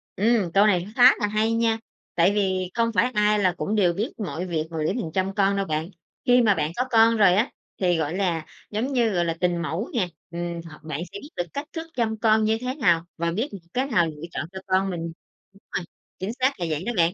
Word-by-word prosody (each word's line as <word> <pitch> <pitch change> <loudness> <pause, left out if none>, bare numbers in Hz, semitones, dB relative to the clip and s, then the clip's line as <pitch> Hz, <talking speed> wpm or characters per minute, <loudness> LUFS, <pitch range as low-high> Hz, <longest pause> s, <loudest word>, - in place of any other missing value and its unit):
Ừm, 210 -3 +2
câu 200 +2 +6
này 180 -2 +2
khá 250 +1 +9
là 210 - +1
hay 215 +2 +1
nha 230 -1 +1 0.4
tại 175 +3 +4
vì 185 -3 0
không 230 0 +1
phải 250 +4 +2
ai 210 0 +3
là 185 -3 +3
cũng 210 - -1
đều 180 -5 +3
biết 210 +6 -3
mọi 185 -4 -4
việc 165 -3 -1
mà 165 - -5
để - - +1
mình 170 -10 -3
chăm 190 +1 -1
con 200 -1 +3
đâu 195 - 0
bạn. 155 +2 -2 0.4
Khi 245 0 +5
mà 215 -4 +5
bạn 155 +1 -1
có 250 - +1
con 225 0 +5
rồi 195 -4 +6
á 220 +7 +2 0.3
thì, 180 -2 +3
gọi 160 +2 -1
là, 170 -5 0 0.3
giống 245 +6 -1
như, 235 -3 +3
gọi 175 -4 +1
là, 165 -1 -1
tình 175 -1 +1
mẫu 170 - -3
nè, 215 -7 +1 0.2
ừm, 170 0 -4
hoặc 155 - -14
bạn 155 0 -4
sẽ - - -6
biết 290 - -11
được 175 - +1
cách 290 +2 -4
thức 325 -1 -5
chăm 220 -2 0
con 220 -1 +4
như 220 +1 +2
thế 255 +1 -3
nào 170 - +2
và 170 0 0
biết 230 - -1 0.2
cái 260 +2 +1
nào 175 -10 +3
lựa 150 -1 -8
chọn - - -3
cho 190 - -7
con 190 +1 +2
mình. 175 -2 -4 0.5
Đúng 195 - -21
rồi, 185 -3 -2 0.3
chính 195 +5 -3
xác 260 -3 +1
là 170 - -1
vậy 155 +2 -2
đó 240 - -1
bạn. 170 0 +3
195 Hz, 250 wpm, -24 LUFS, 175-225 Hz, 0.5 s, khá